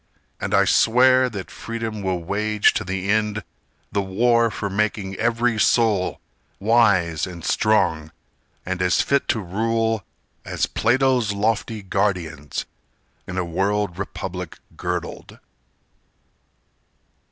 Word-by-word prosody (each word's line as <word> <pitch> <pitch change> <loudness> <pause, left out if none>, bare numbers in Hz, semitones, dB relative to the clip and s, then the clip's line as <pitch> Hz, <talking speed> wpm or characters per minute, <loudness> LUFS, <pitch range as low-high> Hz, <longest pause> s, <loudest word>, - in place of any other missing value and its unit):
And - - -1
I - - +5
swear 130 +2 +4
that 100 -5 -7
Freedom 115 -2 -5
will 95 -3 -2
wage 105 +3 +2
to 110 - -2
the 95 +1 -2
end 105 -1 0 0.5
The 100 - 0
war 115 +4 +2
for 105 - -4
making 100 -1 -1
every 120 -1 +1
soul 105 -4 +2 0.4
Wise 100 -7 +3
and 85 -2 -9
strong 80 -8 +1 0.5
and 95 0 -3
as 90 0 +3
fit 140 0 +1
to 115 - +1
rule 110 +3 -1 0.4
As - - -1
Plato's 125 -2 +2
lofty 110 +1 -1
guardians 80 -8 -2 0.6
In 90 - -5
a 90 - 0
world 95 +1 -1
republic 90 -3 -5 0.2
girdled! 90 -1 -5
105 Hz, 115 wpm, -22 LUFS, 95-115 Hz, 0.6 s, I